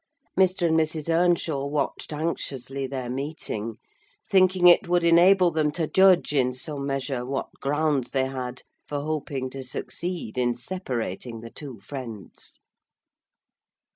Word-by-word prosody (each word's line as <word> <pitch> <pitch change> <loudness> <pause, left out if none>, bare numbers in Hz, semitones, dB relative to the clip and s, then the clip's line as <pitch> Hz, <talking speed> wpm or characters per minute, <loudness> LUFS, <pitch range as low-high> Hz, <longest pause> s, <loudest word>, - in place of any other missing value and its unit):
Mr. 185 -1 +3
and 160 - +2
Mrs. 160 0 0
Earnshaw 165 -4 +2
watched 145 +1 -2
anxiously 140 -4 -3
their 130 -2 -4
meeting; 125 -5 -4 0.5
thinking 185 -1 +4
it 175 -1 +7
would 175 0 +2
enable 175 +2 +6
them 155 -2 +1
to 165 0 0
judge, 190 -2 +4
in 125 -3 +2
some 140 +1 -2
measure, 135 -2 -2
what 135 +2 -3
grounds 145 -2 0
they 135 -1 +1
had 130 -2 -5 0.2
for 145 -1 -3
hoping 145 -3 -3
to 135 - -6
succeed 130 0 -4
in 120 -1 +1
separating 120 - -4
the 115 0 -9
two 135 -7 -8
friends. 115 -6 -9
145 Hz, 135 wpm, -25 LUFS, 130-170 Hz, 0.5 s, it